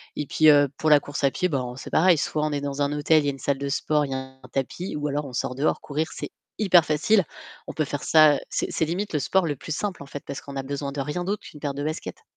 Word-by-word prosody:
Et 150 - -3
puis, 155 +3 +5
heu, 145 -1 +6
pour 155 - +1
la 150 - +8
course 145 0 -6
à 140 - +4
pied, 180 - 0
ben, 130 -5 -2
c'est - - -8
pareil, 175 +1 +4
soit 150 +1 -1
on 155 - -1
est 145 -1 -2
dans 140 0 -3
un 140 - 0
hôtel, 150 +1 +3
il - - -4
y - - +2
a - - +1
une 135 - -10
salle 140 +2 0
de 140 +1 -4
sport, 150 +1 +1
il 135 - -7
y - - -1
a - - -1
un 130 0 -9
tapis, 140 +7 -3
ou 150 0 -2
alors 145 +1 -2
on 130 - -9
sort 125 +1 -2
dehors, 140 +4 0
courir, 155 +2 -2
c'est - - -6 0.3
hyper 185 -6 +5
facile. 165 +8 +3 0.4
On - - -6
peut 155 - 0
faire 145 0 -4
ça, 155 -2 +6
heu, - - -2
c'est - - -1
c'est 160 - 0
limite 180 +6 -3
le 150 - +1
sport 170 +6 +1
le 145 - -1
plus 155 +4 -6
simple, 190 -7 -3
en - - -12
fait, 140 0 -8
parce 140 - -5
qu'on 140 - -10
a - - -1
besoin 140 +1 -4
de 140 - -6
rien 150 +6 -3
d'autre 200 +3 -2
qu'une 150 - -12
paire 145 -2 -2
de 140 +1 -4
baskets. 155 +1 -5
145 Hz, 310 wpm, -25 LUFS, 140-155 Hz, 0.4 s, la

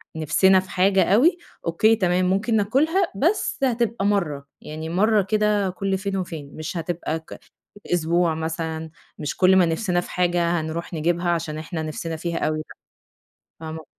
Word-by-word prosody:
نِفسنا 185 +5 +4
في 185 - -8
حاجة 190 +1 +3
أوي، 285 - +4 0.3
أوكي 215 +7 +3
تمام، 180 -3 +1
ممكن 200 +5 +1
ناكلها 305 - +2
بس 335 - 0
هتبقى 235 -4 0
مَرّة، 155 -9 0
يعني 155 +1 -6
مَرّة 210 +4 +3
كده 210 0 +1
كُلّ 190 +1 -2
فين 195 0 -3
وفين، 160 -6 -6
مش 155 +3 -5
هتبقى 165 -1 -3
ك 160 - -12 0.6
أسبوع 170 0 +1
مثلًا، 160 0 -4 0.3
مش 150 -2 -4
كُلّ 190 0 +5
ما 180 -2 +5
نِفسنا 175 +1 0
في - - -10
حاجة 175 -1 +1
هنروح 165 +2 -5
نجيبها 175 +2 0
عشان 165 -2 -2
إحنا 160 +1 -5
نِفسنا 160 +1 -4
فيها 170 +1 -3
أوي، 155 0 -1
لأ 155 - -5 1.0
فاهمة 160 -1 -7
175 Hz, 160 wpm, -23 LUFS, 160-200 Hz, 1.0 s, كُلّ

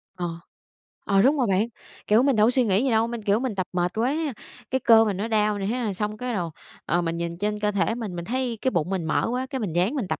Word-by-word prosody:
Ờ, 175 -1 -3 0.8
ờ, 195 -1 +3
đúng 285 +5 +4
rồi 250 -4 +1
bạn, 195 +3 +2 0.4
kiểu, 220 +4 +5
mình 275 -3 +3
đâu 215 +1 +5
có - - +3
suy 255 -1 +3
nghĩ 200 +3 +2
gì 270 - +1
đâu, 225 0 +3
mình, 235 -1 -5
kiểu, 205 +1 +2
mình 250 -5 -2
tập 185 -1 -2
mệt 175 0 0
quá, 250 +6 +1 0.6
cái 260 - 0
cơ 225 -1 +7
mình 200 -3 -1
nó 210 +4 -2
đau 210 -2 +1
nè 195 - -2
ha, 225 -1 -1
xong 210 +2 -3
cái 250 +1 -3
rồi, 175 -5 -2 0.4
ờ, 175 +1 +1
mình 165 -1 -2
nhìn 170 0 -4
trên 210 +2 -1
cơ 210 0 +1
thể 200 +3 0
mình, 215 -7 -5
mình 170 0 -5
thấy 245 +1 -2
cái 260 - +1
bụng 170 -2 0
mình 190 -4 -2
mỡ 160 - +1
quá, 255 +1 -2
cái 265 -3 -3
mình 195 -8 -3
ráng 185 +10 +1
mình 240 -10 -2
tập - - -2
210 Hz, 285 wpm, -25 LUFS, 190-240 Hz, 0.8 s, cơ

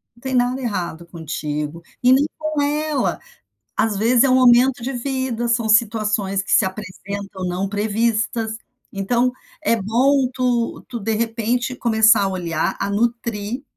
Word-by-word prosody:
Não 235 - -22
tem 260 0 -3
nada 250 +2 +1
errado 175 -7 -4
contigo 155 -1 -5 0.2
e 250 +1 +6
nem 275 +2 +4
com 310 -1 -2
ela. 300 0 0 0.6
Às 220 -2 +1
vezes 235 +4 +4
é - - +3
um 255 - +4
momento 250 0 +5
de 270 +3 -3
vida. 250 -2 -2
São 230 -1 +1
situações 215 -3 +2
que 195 - -7
se - - +5
apresentam 195 0 -6
não 185 +2 -2
previstas. 220 +2 -1 0.4
Então 235 +6 +1 0.3
é 230 - +2
bom 255 +6 +2
tu 245 -2 -1
tu 235 - -5
de 220 +2 -1
repente 230 +3 -1
começar 220 -3 +4
a - - +1
olhar, 170 -4 -2
a 200 - -1
nutrir, 230 +2 -2
230 Hz, 155 wpm, -20 LUFS, 200-250 Hz, 0.6 s, e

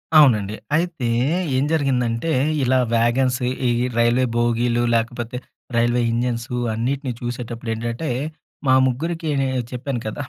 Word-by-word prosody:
అవునండి. 110 -9 +5 0.2
అయితే 170 -7 -1 0.5
ఏం 130 - +2
జరిగిందంటే, 130 -2 0 0.3
ఇలా 130 +1 +3 0.2
వ్యాగన్స్ 125 +3 +2 0.3
ఈ - - +3 0.3
రైల్వే 120 +2 +3
బోగీలు, 120 0 +1
లేకపోతే 120 +1 -2 0.4
రైల్వే 120 +1 +2
ఇంజిన్స్ 120 +1 -1 0.2
అన్నిటిని 130 +3 -2
చూసేటప్పుడు 120 -1 -4
ఏంటంటే, 120 +7 -3 0.6
మా 130 - +6
ముగ్గురికి 160 +5 -2
నేను 130 -2 0
చెప్పాను 125 -1 -3
కదా! 125 +7 -4
120 Hz, 115 wpm, -21 LUFS, 115-135 Hz, 0.6 s, మా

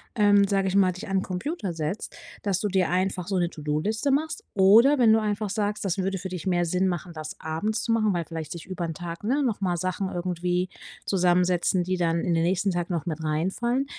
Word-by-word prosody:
ähm, 205 -2 +5
sage 195 -1 +1
ich 190 - -1
mal, 190 -2 +5
dich 180 +1 -8
an 195 -1 +1
Computer 195 - -3
setzt 160 +5 -4 0.3
dass 195 -3 0
du 210 - 0
dir 190 -3 +1
einfach 185 0 -1
so 195 - 0
'ne 175 -1 +2
To-do-Liste 155 - -1
machst 315 +9 0
oder 220 +9 +6
wenn 230 -4 +5
du 225 - +4
einfach 210 -1 -2
sagst, 205 0 -2
das 195 0 -1
würde 190 +1 -1
für 190 - -5
dich 180 -1 -6
mehr 175 -1 +2
Sinn 180 +3 +1
machen, 175 -1 -3
das 155 -1 -7
abends 205 +8 -2
zu - - -1
machen, 220 -2 +2
weil 170 -3 -1
vielleicht 160 -1 -6
sich 170 - -9
über 185 -2 -4
'n 165 -1 -5
Tag, 170 +2 -7
ne, 270 +7 +1
noch 225 -6 -1
mal 180 -2 0
Sachen 185 +2 -2
irgendwie 180 0 -1 0.4
zusammensetzen, 180 -1 +2
die 185 +1 -1
dann 170 -1 +1
in 175 - 0
den 165 - +2
nächsten 190 +3 +1
Tagen 175 0 -2
noch 165 -4 -2
mit 160 -2 -4
reinfallen, 190 - 0
185 Hz, 225 wpm, -26 LUFS, 175-205 Hz, 0.4 s, oder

